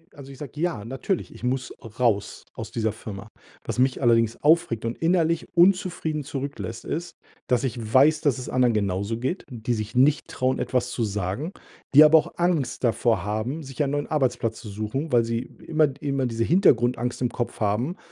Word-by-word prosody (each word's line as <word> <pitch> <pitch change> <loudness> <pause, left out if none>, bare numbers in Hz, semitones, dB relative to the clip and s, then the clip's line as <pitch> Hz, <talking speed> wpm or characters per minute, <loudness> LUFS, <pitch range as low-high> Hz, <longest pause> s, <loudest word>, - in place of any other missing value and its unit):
also, 140 -1 -11
ich 135 - -13
sage: 150 0 -8
„Ja, 165 -12 -1
natürlich, 135 - -3
ich - - -14
muss 125 +1 -1 0.3
raus 110 -5 0
aus - - -7
dieser 110 -1 0
Firma.“ 100 -2 -9 0.3
Was - - -4
mich 130 +1 +2
allerdings 115 -2 +3
aufregt 155 -7 +3
und 115 - -3
innerlich 165 0 +1
unzufrieden 175 -4 +2
zurücklässt, 140 +1 -5
ist, 170 +3 -4 0.3
dass 125 -2 +1
ich 125 -3 -2 0.2
weiß, 150 +4 +5
dass 140 -3 +1
es 125 - -6
anderen 125 -2 +3
genauso 100 +2 -1
geht, 130 +10 -3
die 120 -1 -2
sich 110 +1 -5
nicht 140 +4 +3
trauen, 130 +1 0
etwas 125 -1 -1
zu 120 - -2
sagen, 105 - -3 0.4
die 145 +2 +10
aber 155 +1 +7
auch 155 - 0
Angst 165 -9 0
davor 115 -5 +2
haben, 110 +9 -3
sich 135 0 -3
einen 140 - -1
neuen 145 0 -2
Arbeitsplatz 125 -6 0
zu 115 - -9
suchen, 110 +9 -4
weil 120 -1 +4
sie 115 0 -1
immer 155 +4 0
immer 140 -2 -1
diese 115 -2 -1
Hintergrundangst 125 - +2
im 125 - +1
Kopf 120 0 -4
haben: 115 - 0
130 Hz, 185 wpm, -25 LUFS, 115-150 Hz, 0.4 s, die